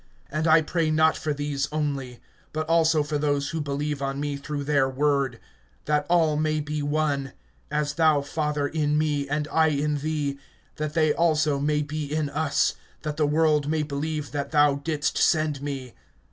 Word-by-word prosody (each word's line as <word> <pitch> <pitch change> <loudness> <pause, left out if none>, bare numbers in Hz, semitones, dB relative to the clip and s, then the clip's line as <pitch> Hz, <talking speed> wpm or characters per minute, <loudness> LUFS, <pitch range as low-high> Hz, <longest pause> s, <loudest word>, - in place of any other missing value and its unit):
(20)And 155 +2 0
I 160 0 +6
pray 165 0 0
not 155 0 +4
for 155 - -3
these 145 -1 -2
only, 140 -5 -3 0.3
but 155 0 -2
also 165 -2 +3
for 150 0 -2
those 145 -1 0
who 165 -1 -2
believe 145 0 -3
on 135 0 -2
me 145 0 -2
through 145 +1 -4
their 140 -2 +2
word; 140 -2 0 0.5
(21)that 150 -1 +1
all 165 -3 +3
may 155 0 +1
be 150 0 -3
one; 145 -2 -1 0.4
as 150 -1 -1
thou, 155 -2 +3
Father, 150 0 -1
in 150 -1 0
me 145 -2 0
and 150 +1 -1
I 160 0 +4
in 150 0 0
thee, 145 -2 -2 0.4
that 155 0 -3
they 155 -2 +3
also 155 -3 +2
may 150 +1 +1
be 150 +1 -4
in 155 -2 -1
us; 155 0 +1 0.3
that 150 -1 -3
the 150 -2 +2
world 150 -1 +2
may 155 -1 +1
believe 150 +1 -3
that 145 -1 -3
thou 145 -2 +4
didst 150 -2 -1
send 155 -3 +2
me. 135 -4 -5
150 Hz, 180 wpm, -25 LUFS, 145-155 Hz, 0.5 s, I